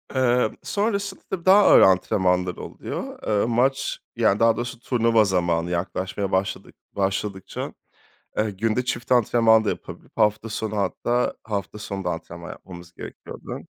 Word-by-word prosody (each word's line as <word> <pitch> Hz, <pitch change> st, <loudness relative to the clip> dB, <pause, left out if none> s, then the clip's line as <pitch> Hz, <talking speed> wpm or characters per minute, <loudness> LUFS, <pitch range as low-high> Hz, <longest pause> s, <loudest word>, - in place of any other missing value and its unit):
Emm, 125 Hz, -3 st, +2 dB
sonrasında, 200 Hz, -2 st, -2 dB
tabii, 185 Hz, -3 st, -4 dB
daha 195 Hz, +2 st, +7 dB
ağır -, -, +7 dB
antrenmanlar 90 Hz, -1 st, +3 dB
oluyor. -, -, -7 dB
Eee, 105 Hz, -1 st, +2 dB
maç 135 Hz, +3 st, +1 dB, 0.2 s
yani 110 Hz, -4 st, +2 dB
daha 115 Hz, -1 st, +4 dB
doğrusu 120 Hz, +1 st, -4 dB
turnuva 115 Hz, -2 st, +3 dB
zamanı 85 Hz, -3 st, 0 dB
yaklaşmaya 95 Hz, +3 st, -2 dB
başladık 95 Hz, +1 st, -2 dB, 0.2 s
başladıkça, 95 Hz, 0 st, -3 dB, 0.7 s
eee, 105 Hz, 0 st, +1 dB
günde 110 Hz, +5 st, -1 dB
çift 120 Hz, 0 st, -2 dB
antrenman 115 Hz, -2 st, +4 dB
da -, -, -1 dB
yapabilip -, -, -6 dB
hafta 105 Hz, +1 st, +2 dB
sonu 110 Hz, 0 st, -3 dB
hatta 120 Hz, +4 st, 0 dB
hafta 105 Hz, -1 st, -4 dB
sonu 100 Hz, -2 st, -5 dB
da 90 Hz, -, 0 dB
antrenman 85 Hz, 0 st, -7 dB
yapmamız 85 Hz, -1 st, -11 dB
gerekiyordu. -, -, -8 dB
105 Hz, 140 wpm, -24 LUFS, 95-120 Hz, 0.7 s, daha